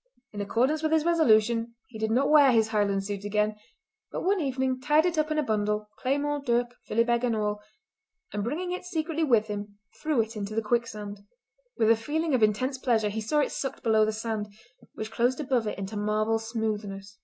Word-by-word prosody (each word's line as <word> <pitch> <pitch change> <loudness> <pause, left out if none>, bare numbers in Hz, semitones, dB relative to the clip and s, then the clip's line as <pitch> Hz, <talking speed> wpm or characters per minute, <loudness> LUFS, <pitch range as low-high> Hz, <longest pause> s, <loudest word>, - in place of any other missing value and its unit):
In 205 - -4
accordance 255 +9 +1
with 315 0 0
his 320 -1 +3
resolution 235 -8 +3
he 230 -9 -11
did 220 0 0
not 265 +6 +2
wear 290 -3 +7
his 225 -2 +3
Highland 200 -2 +1
suit 200 -1 -4
again, 210 +1 0 0.6
but - - -4
one 385 0 +2
evening 260 -2 -1
tied 300 +4 +3
it 355 -1 +1
up 310 0 +1
in 310 - -1
a 305 - +2
bundle, 210 -2 -1
claymore, 290 +2 0
dirk 240 -1 +1
and 245 - -30
philibeg 235 +1 +3
and 240 -2 +1
all, 210 -1 -1 0.7
and 205 -1 -2
bringing 330 - -3
it 365 - -4
secretly 325 -2 -2
with 235 -7 +3
him 205 -1 -6 0.2
threw 305 -5 +1
it 225 +1 -5
into 210 0 -4
the 225 - 0
quicksand. 210 -3 -2 0.6
With 220 0 +4
a - - +6
feeling 300 +7 -2
of 255 - +2
intense 255 +6 +1
pleasure 225 -5 +1
he 220 +2 -3
saw 295 +8 +1
it - - -1
sucked 270 - -4
below 220 -2 +4
the 215 - +1
sand, 215 -1 -4 0.4
which 220 0 -5
closed 245 +4 +1
above 255 -6 0
it - - -3
into 195 +2 -5
marble 215 +2 +1
smoothness. 210 -3 -4
225 Hz, 205 wpm, -27 LUFS, 210-275 Hz, 0.7 s, wear